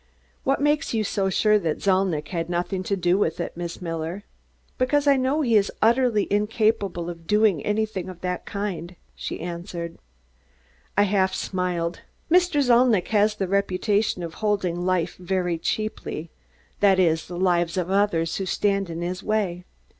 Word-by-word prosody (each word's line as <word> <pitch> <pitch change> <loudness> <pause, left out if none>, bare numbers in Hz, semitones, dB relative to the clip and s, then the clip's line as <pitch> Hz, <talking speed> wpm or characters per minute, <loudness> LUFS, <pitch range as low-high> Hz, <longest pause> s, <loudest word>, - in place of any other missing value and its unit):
"What 270 +1 +1
makes 295 -2 +1
you 220 - +1
so 195 -1 0
sure 210 +2 +3
that 165 -5 -1
Zalnitch 185 -5 +1
had 165 -2 -3
nothing 180 +2 -1
to 200 - 0
do 180 0 +2
with 165 -5 0
it, - - -4
Miss 175 +1 -6
Miller?" 165 +3 -4 0.6
"Because 280 +3 +2
I 280 -1 +6
know 265 +4 +1
he 235 -6 +2
is 205 -1 +3
utterly 230 -2 +3
incapable 210 -4 +1
of 165 -1 -8
doing 210 -7 +3
anything 210 -3 -1
of 180 -2 -10
that 180 0 -3
kind," 185 -4 -4 0.2
she - - -5
answered. 170 0 -6 1.0
I 205 - +6
half 190 -2 +1
smiled. 180 -3 -2 0.3
"Mr. 350 -5 +4
Zalnitch 240 -6 +4
has 210 0 +3
the 195 -3 -2
reputation 200 0 0
of 165 -1 -5
holding 185 -4 0
life 180 -2 0
very 180 -2 -1
cheaply 170 -5 -3 0.5
that 195 -2 +5
is, 165 -3 +2
the 175 - -6
lives 175 -1 +1
of 180 0 -1
others 195 -5 +1
who 195 - -3
stand 195 -1 0
in 165 0 -5
his 180 +1 -3
way. 190 -5 -1
190 Hz, 160 wpm, -24 LUFS, 175-210 Hz, 1.0 s, I